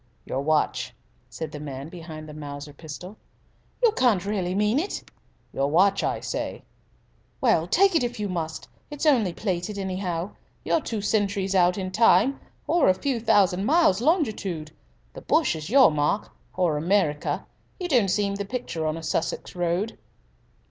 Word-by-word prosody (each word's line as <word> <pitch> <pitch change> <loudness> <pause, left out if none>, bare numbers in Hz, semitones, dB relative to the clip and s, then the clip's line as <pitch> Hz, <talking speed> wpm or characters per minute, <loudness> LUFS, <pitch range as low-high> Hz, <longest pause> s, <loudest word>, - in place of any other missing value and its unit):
"Your 135 - -2
watch," 155 +1 0 0.3
said 160 - -6
the 150 - -7
man 140 -1 -6
behind 160 -3 -9
the 150 - -9
Mauser 145 -1 -8
pistol. 170 +7 -9 0.7
"You 470 - +6
can't 230 - +2
really 190 -3 -1
mean 210 +6 +2
it!" 380 +6 -4 0.5
"Your 135 +1 0
watch, 195 +5 +4
I - - -1
say!" - - -4 0.8
"Well, 200 -10 +2
take 390 - +4
it, 320 - +3
if 240 -2 -3
you 210 - -1
must. 165 -4 -4 0.2
It's 295 +1 -4
only 240 - +4
plated, 185 +1 -3
anyhow. 185 -2 -3 0.3
You're 325 - +2
two 220 -6 -3
centuries 200 -2 0
out 180 -1 +4
in 185 -1 -3
time, 225 +5 +4 0.3
or 345 - +3
a 185 - +4
few 260 +4 -1
thousand 195 -4 +3
miles 295 - +4
longitude. 210 - 0 0.4
The - - -9
bush 315 - +2
is 155 +1 -6
your 265 -5 +7
mark 150 +7 0 0.2
or 175 -5 +1
America. 160 -3 0 0.3
You 360 - -2
don't 245 - +3
seem 200 +1 +1
in 200 - -6
the 200 - -2
picture 195 -9 -3
on 155 +1 -1
a 165 - -8
Sussex 160 +2 -2
road." 175 +5 -1
190 Hz, 165 wpm, -25 LUFS, 160-220 Hz, 0.8 s, your